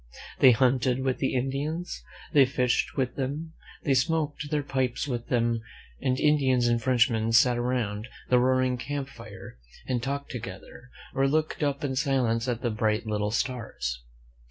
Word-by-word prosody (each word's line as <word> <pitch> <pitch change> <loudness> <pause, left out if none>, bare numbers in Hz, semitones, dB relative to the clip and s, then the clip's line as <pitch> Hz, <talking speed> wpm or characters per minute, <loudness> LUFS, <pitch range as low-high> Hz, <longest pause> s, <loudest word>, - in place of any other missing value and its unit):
They 130 - +8
hunted 125 +1 +3
with 130 -1 0
the 135 - 0
Indians; 140 - -2 0.3
they 140 -3 +7
fished 125 -1 0
with 130 -2 -1
them, 145 +4 -3 0.3
they 140 - +2
smoked 150 +2 0
their 150 -1 0
pipes 130 -1 -1
with 120 -3 -3
them, 115 -2 +1 0.4
and 130 0 0
Indians 135 -5 +3
and 120 0 +2
French 120 -1 +4
men 115 -2 -1
sat 120 +1 +5
around 120 -3 -1 0.2
the 125 - +4
roaring 130 0 +2
camp 140 +1 -4
fire 100 - -11 0.3
and 125 -2 -1
talked 140 +3 -3
together, 120 +2 -8 0.2
or 135 0 +2
looked 155 +3 0
up 145 -1 0
in 135 -2 -1
silence 130 -3 +1
at 120 -2 -1
the 120 - +1
bright 110 +1 0
little 105 -1 -1
stars. 110 - -3
125 Hz, 160 wpm, -27 LUFS, 120-135 Hz, 0.4 s, They